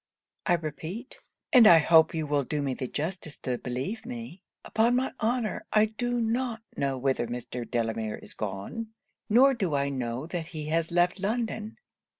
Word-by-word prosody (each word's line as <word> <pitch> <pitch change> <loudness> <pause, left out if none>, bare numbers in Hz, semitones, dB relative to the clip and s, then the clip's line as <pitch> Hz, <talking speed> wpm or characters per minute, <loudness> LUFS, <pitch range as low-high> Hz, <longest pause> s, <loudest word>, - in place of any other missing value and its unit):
I 175 - +4
repeat 170 - -4 0.3
and 245 -4 +9
I 170 - +9
hope 160 +1 +5
you 160 -1 -1
will 145 -1 +1
do 150 +2 -2
me 135 -2 -1
the 130 0 -4
justice 155 +2 -3
to 125 -1 -2
believe 135 - -4
me 235 -6 -7 0.2
upon 230 +3 +2
my 260 +1 +1
honour 230 0 -1
I 215 0 +5
do 245 +3 -2
not 230 0 -1
know 135 -1 -1
whither 130 -2 0
Mr. 120 0 -5
Delamere 115 -2 -1
is - - -7
gone 110 - -5 0.3
nor 260 +5 +6
do 190 - -1
I 140 0 +1
know 125 0 -3
that 165 -1 -4
he 155 -3 -6
has 165 +1 +1
left 175 +2 +2
London.' 220 +1 -2
165 Hz, 170 wpm, -28 LUFS, 135-225 Hz, 0.3 s, and